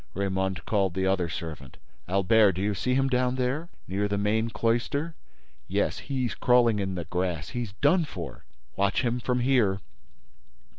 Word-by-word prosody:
Raymonde 95 -3 -1
called 95 -4 +1
the 95 0 0
other 95 -3 +1
servant: 80 -5 -7 0.3
"Albert, 100 +2 +4
do 90 - -4
you 105 +1 +1
see 125 +7 0
him 135 0 +2
down 125 -1 +1
there? 130 +6 -1 0.2
Near 100 +2 0
the 100 0 -1
main 110 +3 +1
cloister?—" 120 +9 0 0.5
"Yes, - - 0
he's 130 -3 -2
crawling 120 -3 +3
in 95 -1 -2
the 85 -2 -4
grass. 90 -3 -2
He's 120 -5 -4
done 165 +4 +4
for—" 85 - -8 0.3
"Watch 100 +5 +1
him 120 0 0
from 125 +1 0
here." 120 -7 +3
105 Hz, 160 wpm, -27 LUFS, 95-125 Hz, 0.5 s, Albert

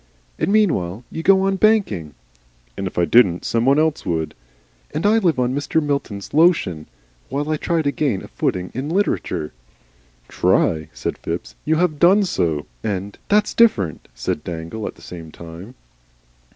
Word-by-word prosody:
"And 195 - +1
meanwhile 125 - +1
you 160 - -4
go 190 +2 +5
on 195 0 +1
banking 150 - +2 0.3
" - - -36 0.2
"If 95 -2 -5
I 90 - +3
didn't, 90 -1 +4
some 115 0 +1
one 135 +2 +4
else 155 -1 +1
would." 80 -3 -2 0.6
"And 165 - -1
I 220 +2 +5
live 175 -9 +2
on 125 0 +1
Mr. 145 +3 0
Milton's 140 -10 -3
Lotion 150 - +3 0.4
while 145 +2 -2
I 155 - +1
try 165 +1 0
to 145 - +1
gain 135 -10 -1
a - - -9
footing 90 0 -2
in 135 +5 -4
Literature." 170 - -1 0.7
"TRY!" 80 -1 +1
said - - -4
Phipps. - - -5
"You 160 - +2
HAVE 160 -3 +1
done 195 +4 +6
so." 85 - -1 0.2
And, 100 -1 -3
"That's 210 +1 +3
different," 105 - +2
said - - -3
Dangle, 85 +6 -5
at - - -7
the - - -18
same 80 -3 -9
time. 85 +10 -11
125 Hz, 165 wpm, -21 LUFS, -, 0.7 s, done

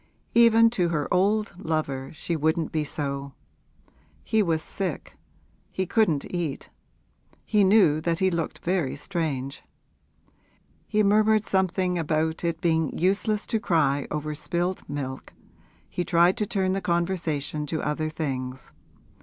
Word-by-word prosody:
Even 230 -1 +6
to 180 -7 +1
her 150 -4 -1
old 205 +4 +2
lover 140 -4 -2
she 170 - -3
wouldn't 160 +1 0
be 155 -1 0
so! 140 -2 -4 0.9
He 220 - +2
was 165 -5 0
sick; 185 -6 -4 0.6
he 190 - -2
couldn't 175 -9 +2
eat; 170 -6 -3 0.7
he 210 -2 +3
knew 190 -6 +5
that 165 0 0
he 190 +1 +2
looked 170 -2 -3
very 175 -6 0
strange. 145 -7 -3 1.3
He 215 -1 +2
murmured 215 +1 +4
something 185 -2 0
about 160 +1 -1
it 170 -1 -1
being 160 -3 +1
useless 205 +4 +1
to 225 - 0
cry 145 -8 +1
over 150 0 -3
spilled 175 +4 -2
milk 135 -2 -5 0.5
he 175 - -3
tried 175 +1 +4
to 210 -3 0
turn 190 -3 0
the 195 - -1
conversation 170 -4 -1
to 160 +2 -2
other 155 +1 -1
things. 130 -5 -4
170 Hz, 135 wpm, -26 LUFS, 150-190 Hz, 1.3 s, Even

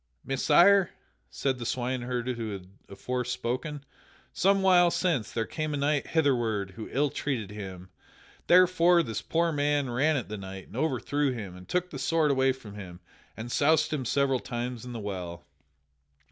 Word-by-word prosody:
"Messire," 170 +8 +5 0.4
said 130 - -2
the - - -4
swineherd 125 0 -2
who 115 -4 -3
had 95 -2 -9 0.2
afore 125 +6 -3
spoken, 130 +4 -4 0.5
"some 195 0 +2
while 180 -2 +6
since 165 - 0
there 115 -1 -1
came 155 -2 -3
a - - -2
knight 145 +1 0
hitherward 120 - +1
who 110 +3 -8
ill 145 +1 +1
treated 115 -9 -3
him. 95 -3 -8 0.6
Thereupon 175 -1 +5
this 115 -3 -4
poor 165 0 0
man 145 -3 0
ran 145 +6 +2
at 125 - -4
the 105 - -5
knight 95 0 -8
and - - -12
overthrew 145 -1 0
him 100 -7 -7
and 90 0 -13
took 180 0 -1
the 135 - -6
sword 155 +2 +2
away 130 -1 +3
from 115 -6 -9
him 90 -4 -9 0.4
and 115 +2 -6
soused 155 +2 +3
him 145 -4 -1
several 135 +1 +1
times 120 0 -5
in 125 - -7
the 115 - -5
well. 90 -4 -6
130 Hz, 170 wpm, -28 LUFS, 110-150 Hz, 0.6 s, while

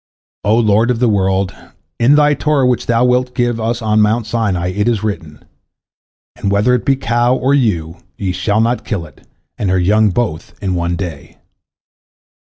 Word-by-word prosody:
O 105 +2 +2
Lord 110 0 +3
of 125 - +1
the 125 +1 +2
world, 95 -2 0 0.5
in 130 +5 +5
Thy 150 0 +4
Torah 145 -2 +1
which 125 -1 0
Thou 120 +1 +2
wilt 125 0 +1
give 120 -1 0
us 115 +1 -2
on 110 0 +2
Mount 110 +2 +1
Sinai 105 -6 -1
it 105 +4 -1
is 115 -4 0
written, 85 -8 -5 0.9
And 100 - -2
whether 105 +5 +2
it 125 - 0
be 135 - +3
cow 120 0 +1
or 130 +2 +1
ewe, 90 - 0 0.2
ye 95 -2 -2
shall 100 +4 0
not 120 +2 0
kill 100 -7 -3
it 75 - -19 0.3
and 100 - -1
her 95 - +2
young 105 +4 +3
both 95 -5 -3
in 95 -2 -2
one 85 0 -1
day. 85 -6 -7
110 Hz, 180 wpm, -16 LUFS, 95-120 Hz, 0.9 s, in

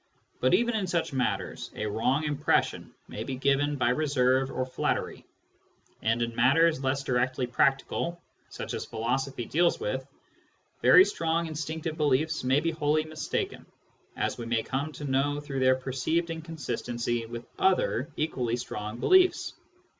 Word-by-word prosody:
But 130 +7 +4
even 235 +3 +1
in 200 -4 -1
such 170 -4 -1
matters 130 -2 -2
a - - -3
wrong 120 +8 0
impression 150 -1 0 0.2
may 110 - -5
be 130 +3 -4
given 140 +2 +1
by 125 -3 +1
reserve 130 -1 +2
or 130 - -2
flattery; 130 - -2 0.7
and 115 +2 +1
in 115 -1 -4
matters 140 +5 +4
less 135 +1 0
directly 130 0 0
practical, 135 +7 0 0.3
such - - -6
as - - -3
philosophy 120 +3 -2
deals 170 +7 +2
with, - - -2 0.8
very 370 - +8
strong 165 - -1
instinctive 160 0 -4
beliefs 150 +1 +1
may 130 +3 +3
be 165 - 0
wholly 155 -1 +1
mistaken, 155 0 -3 0.5
as - - -1
we 115 - -5
may 115 -1 +1
come 140 +4 -3
to 150 - -8
know 140 +1 0
through 140 -2 -4
their 130 0 +4
perceived 135 +6 -1
inconsistency 120 -8 -3
with 120 +1 -7
other 180 -8 +2
equally 125 -6 -1
strong 105 -2 -5
beliefs. 370 - +4
135 Hz, 145 wpm, -28 LUFS, 125-160 Hz, 0.8 s, very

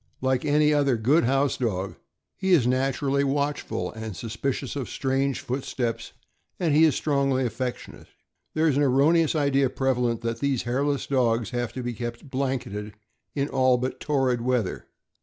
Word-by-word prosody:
Like 130 -1 0
any 150 0 +3
other 140 -4 +2
good 135 +9 +3
house 135 +2 +1
dog, 95 -6 -2 0.4
he 190 -1 +1
is 145 -9 +5
naturally 135 +2 +1
watchful 140 -5 -1
and 110 -3 -7
suspicious 125 +6 -3
of 135 -4 -4
strange 135 0 -1
footsteps, 125 -2 -3 0.5
and 165 -5 +1
he 155 +2 +6
is 155 - +3
strongly 135 -3 +1
affec 125 +2 -2
tionate. - - -13 0.5
There 160 +1 +3
is 140 -3 +2
an - - +3
erroneous 150 +5 +3
idea 140 -3 +2
prevalent 125 -3 0
that 115 0 -3
these 140 -2 0
hairless 140 +3 0
dogs 120 -4 +1
have 120 -2 -2
to 130 0 -5
be 120 0 -3
kept 120 +3 -6
blanketed 120 -6 -3 0.4
in 140 -1 0
all 130 -2 +3
but 125 +1 -3
torrid 135 -5 +1
weather. 120 -5 -1
130 Hz, 160 wpm, -25 LUFS, 120-140 Hz, 0.5 s, he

